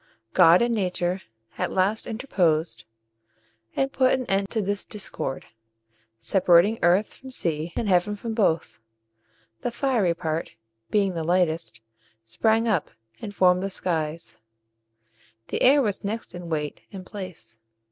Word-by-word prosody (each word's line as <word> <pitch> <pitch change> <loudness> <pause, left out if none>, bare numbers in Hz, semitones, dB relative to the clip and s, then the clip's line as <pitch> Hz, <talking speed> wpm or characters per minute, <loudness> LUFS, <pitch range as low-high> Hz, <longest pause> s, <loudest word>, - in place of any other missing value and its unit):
God 180 +3 +7
and 235 0 +1
Nature 185 -3 -1 0.4
at - - -1
last 195 +4 +1
interposed, 165 - 0 0.9
and 270 0 0
put 260 -1 +3
an 255 -1 -3
end 195 -1 0
to 225 - -1
this 200 0 -1
discord, 190 -9 -4 0.7
separating 180 - +4
earth 180 +5 +3
from 265 - -12
sea, 165 -9 -2
and 225 - -1
heaven 190 +2 +2
from 225 +2 -5
both. 160 - 0 0.8
The - - -2
fiery 235 -8 +1
part, 165 -1 -3 0.4
being 200 -3 +2
the 165 -2 -3
lightest, 170 -4 0 0.4
sprang 220 - +1
up, 200 -9 +1 0.3
and 205 - -7
formed 180 -1 +4
the 195 - -2
skies; 165 -4 -2 1.1
the - - -2
air 280 +2 +6
was 205 -4 -1
next 210 -1 -4
in 175 -1 -8
weight 150 -2 -3
and 190 -2 -8
place. 185 - -9
185 Hz, 135 wpm, -25 LUFS, 170-215 Hz, 1.1 s, God